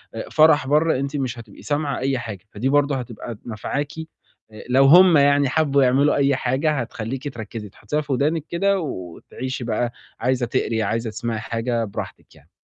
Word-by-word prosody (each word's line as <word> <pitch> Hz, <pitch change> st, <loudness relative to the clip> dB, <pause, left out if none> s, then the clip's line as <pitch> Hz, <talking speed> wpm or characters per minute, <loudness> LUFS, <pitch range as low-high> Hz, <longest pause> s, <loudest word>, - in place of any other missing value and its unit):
آآ 110 Hz, -, -6 dB
فَرَح 155 Hz, -3 st, +5 dB
برّه، 150 Hz, -1 st, +2 dB
أنتِ 140 Hz, +1 st, -3 dB
مش 125 Hz, -3 st, -3 dB
هتبقي 110 Hz, -3 st, -13 dB
سامعة 145 Hz, -1 st, -1 dB
أي 135 Hz, -1 st, 0 dB
حاجة، 105 Hz, -6 st, -7 dB
فدي 120 Hz, +6 st, -2 dB
برضه 145 Hz, 0 st, +2 dB
هتبقى 120 Hz, -2 st, -6 dB
نافعاكِ. 140 Hz, +6 st, -3 dB, 0.6 s
آآ 110 Hz, -, -11 dB
لو 135 Hz, +2 st, +5 dB
هم 175 Hz, +2 st, +8 dB
يعني 140 Hz, -1 st, +4 dB
حبّوا 140 Hz, -3 st, +2 dB
يعملوا 135 Hz, +3 st, +3 dB
أي 140 Hz, -1 st, +3 dB
حاجة، 135 Hz, +5 st, 0 dB
هتخلّيكِ 130 Hz, +1 st, -4 dB
تركّزي، 110 Hz, -1 st, -7 dB
هتحُطّيها 150 Hz, +9 st, -3 dB
في 145 Hz, -2 st, -3 dB
ودانِك 150 Hz, +4 st, 0 dB
كده 195 Hz, +3 st, +1 dB
وتعيشي 130 Hz, -, -6 dB
بقى، 120 Hz, +1 st, -1 dB, 0.3 s
عايزة 125 Hz, +1 st, 0 dB
تقري، 115 Hz, -2 st, -1 dB
عايزة 115 Hz, +3 st, -1 dB
تسمعي 115 Hz, 0 st, -3 dB
حاجة 115 Hz, +1 st, -2 dB
براحتِك 100 Hz, -, -8 dB
يعني. -, -, -22 dB
130 Hz, 170 wpm, -22 LUFS, 115-145 Hz, 0.6 s, هم